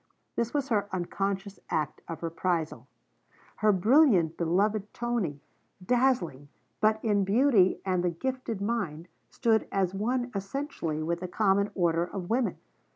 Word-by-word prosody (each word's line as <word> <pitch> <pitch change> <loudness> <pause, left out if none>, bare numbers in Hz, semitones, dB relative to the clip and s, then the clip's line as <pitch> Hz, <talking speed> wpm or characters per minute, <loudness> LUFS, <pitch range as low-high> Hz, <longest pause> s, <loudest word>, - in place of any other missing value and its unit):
This 235 0 -1
was 285 -2 -1
her 205 -3 +1
unconscious 195 +2 -3
act 155 -1 -2
of 165 0 -7
reprisal. 165 -1 -2 0.7
Her 215 0 +4
brilliant 200 - +4
beloved 200 +5 0
Tony, 230 -12 -2 0.4
dazzling 215 - +1 0.3
but 215 0 +3
in 205 -2 +3
beauty 205 -2 +4
and 185 -2 +1
the 180 - +2
gifted 235 +3 -4
mind, 190 -7 -2 0.2
stood 225 -3 +1
as 190 -2 0
one 245 +5 -1
essentially 195 - -3
with 170 +2 -1
the 180 - -4
common 200 +1 +2
order 170 -2 +2
of 180 +1 -6
women. 245 +1 +1
195 Hz, 135 wpm, -28 LUFS, 175-230 Hz, 0.7 s, Her